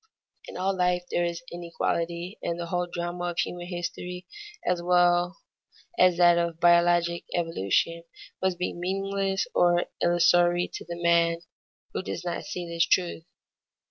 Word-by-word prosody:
In -, -, -8 dB
all 190 Hz, +2 st, 0 dB
life 180 Hz, -1 st, +1 dB
there 175 Hz, -, +1 dB
is 170 Hz, 0 st, -4 dB
inequality, 170 Hz, +2 st, -3 dB
and 170 Hz, 0 st, -3 dB
the 170 Hz, -, -3 dB
whole 175 Hz, +1 st, -1 dB
drama 175 Hz, 0 st, -3 dB
of 175 Hz, -1 st, -3 dB
human 175 Hz, 0 st, -2 dB
history 180 Hz, 0 st, -5 dB, 0.4 s
as 180 Hz, -1 st, +1 dB
well 175 Hz, 0 st, +3 dB, 0.6 s
as 180 Hz, -, +4 dB
that 175 Hz, -1 st, +6 dB
of 170 Hz, -1 st, -2 dB
biologic 170 Hz, 0 st, +3 dB
evolution 165 Hz, -, 0 dB, 0.4 s
must 190 Hz, -1 st, 0 dB
be 180 Hz, -, -2 dB
meaningless 195 Hz, +2 st, -1 dB
or 175 Hz, 0 st, +3 dB, 0.2 s
illusory 175 Hz, 0 st, +4 dB
to -, -, -6 dB
the 170 Hz, 0 st, -6 dB
man 170 Hz, -1 st, +3 dB, 0.5 s
who -, -, -2 dB
does 95 Hz, -, -6 dB
not 175 Hz, -, -3 dB
see 180 Hz, -3 st, -5 dB
this 170 Hz, 0 st, +1 dB
truth. 175 Hz, -2 st, +1 dB
175 Hz, 145 wpm, -27 LUFS, 170-180 Hz, 0.6 s, that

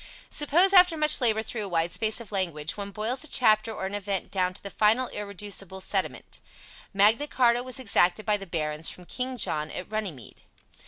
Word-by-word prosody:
Suppose 340 Hz, +6 st, +3 dB
after 360 Hz, -3 st, +6 dB
much 305 Hz, -2 st, +3 dB
labor 220 Hz, -3 st, +2 dB
through 220 Hz, -1 st, -5 dB
a -, -, -4 dB
wide 170 Hz, -1 st, 0 dB
space 220 Hz, +1 st, +1 dB
of 230 Hz, -4 st, -10 dB
language 170 Hz, -6 st, -2 dB
one 200 Hz, -1 st, -5 dB
boils 220 Hz, +7 st, -3 dB
a -, -, -7 dB
chapter 220 Hz, -5 st, +3 dB
or 200 Hz, -, -5 dB
an 190 Hz, -, -4 dB
event 200 Hz, -2 st, -3 dB
down 185 Hz, -2 st, 0 dB
to -, -, -10 dB
the 200 Hz, -, -7 dB
final 225 Hz, +6 st, +2 dB
irreducible 200 Hz, -2 st, -6 dB
sediment: -, -, -3 dB, 0.5 s
"Magna 215 Hz, +8 st, +3 dB
Charta 240 Hz, -3 st, +2 dB
was 255 Hz, +1 st, -4 dB
exacted 205 Hz, -4 st, +2 dB
by 210 Hz, 0 st, +2 dB
the 195 Hz, -1 st, -10 dB
barons 155 Hz, -1 st, -1 dB
from 180 Hz, -, -8 dB
King 255 Hz, +6 st, -4 dB
John 155 Hz, -8 st, 0 dB
at 180 Hz, -, -7 dB
Runnymede." 175 Hz, -, -5 dB
210 Hz, 195 wpm, -26 LUFS, 185-245 Hz, 0.5 s, after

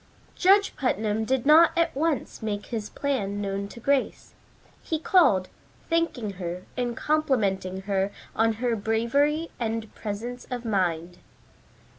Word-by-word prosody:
Judge 395 Hz, +2 st, +4 dB
Putnam 220 Hz, -4 st, 0 dB
did 260 Hz, +1 st, 0 dB
not 320 Hz, +3 st, +6 dB
at 335 Hz, -3 st, +2 dB
once 300 Hz, -3 st, -1 dB
make 205 Hz, -2 st, -3 dB
his 220 Hz, -3 st, -4 dB
plan 205 Hz, -8 st, -2 dB
known 200 Hz, 0 st, -3 dB
to 235 Hz, -, -11 dB
Grace. 275 Hz, +3 st, -1 dB, 0.5 s
He 320 Hz, -, -2 dB
called, 305 Hz, -, +4 dB, 0.4 s
thanking 330 Hz, -10 st, 0 dB
her 175 Hz, +1 st, -4 dB
and 245 Hz, -2 st, -2 dB
complimenting 200 Hz, -11 st, 0 dB
her 195 Hz, 0 st, 0 dB, 0.3 s
on 225 Hz, 0 st, +3 dB
her 235 Hz, +1 st, -1 dB
bravery 235 Hz, +9 st, +1 dB
and 225 Hz, -2 st, -3 dB
presence 230 Hz, +4 st, -6 dB
of 245 Hz, -1 st, -5 dB
mind. 180 Hz, -4 st, -1 dB
225 Hz, 130 wpm, -26 LUFS, 200-280 Hz, 0.5 s, not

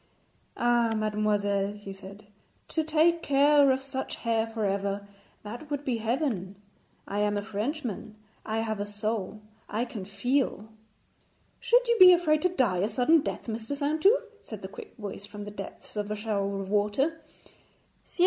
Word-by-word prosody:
'Ah, 240 Hz, -1 st, +2 dB
mademoiselle,' 205 Hz, -2 st, 0 dB
he 205 Hz, -1 st, -9 dB
said, 195 Hz, +2 st, -12 dB, 0.4 s
'to 320 Hz, -, 0 dB
take 325 Hz, +2 st, +3 dB
care 285 Hz, 0 st, +5 dB
of 265 Hz, 0 st, +1 dB
such 265 Hz, -1 st, -4 dB
hair 230 Hz, -1 st, 0 dB
for 225 Hz, -1 st, -3 dB
ever 200 Hz, 0 st, -1 dB, 0.4 s
that 240 Hz, +8 st, -8 dB
would 290 Hz, -1 st, -3 dB
be 250 Hz, -3 st, 0 dB
heaven. 225 Hz, -, -1 dB, 0.5 s
I 205 Hz, -, -2 dB
am 210 Hz, 0 st, +1 dB
a 205 Hz, -, -2 dB
Frenchman; 220 Hz, -, -4 dB, 0.3 s
I 220 Hz, +1 st, -1 dB
have 220 Hz, -2 st, -2 dB
a 205 Hz, -, -1 dB
soul; 210 Hz, 0 st, -3 dB, 0.3 s
I 225 Hz, +3 st, -1 dB
can 210 Hz, -5 st, -7 dB
feel.' 220 Hz, +1 st, -1 dB, 0.9 s
'Should -, -, +3 dB
you 470 Hz, 0 st, +3 dB
be 365 Hz, -1 st, +11 dB
afraid 310 Hz, -3 st, +3 dB
to 365 Hz, -, +3 dB
die 255 Hz, -, +1 dB
a 200 Hz, +4 st, +1 dB
sudden 260 Hz, +8 st, +4 dB
death, -, -, -4 dB
Mr. 225 Hz, +3 st, -4 dB
Saintou?' 315 Hz, -, +3 dB, 0.2 s
said -, -, -9 dB
the -, -, -4 dB
quick 465 Hz, -, -11 dB
voice 205 Hz, -2 st, -7 dB
from 205 Hz, 0 st, -8 dB
the 205 Hz, -, -7 dB
depths 200 Hz, +1 st, -9 dB
of 210 Hz, 0 st, -2 dB
a 210 Hz, -, -1 dB
shower 200 Hz, -2 st, -2 dB
of 195 Hz, -, -5 dB
water. 210 Hz, +11 st, +1 dB, 0.8 s
'Ciel! -, -, -13 dB
220 Hz, 170 wpm, -28 LUFS, 205-285 Hz, 0.9 s, be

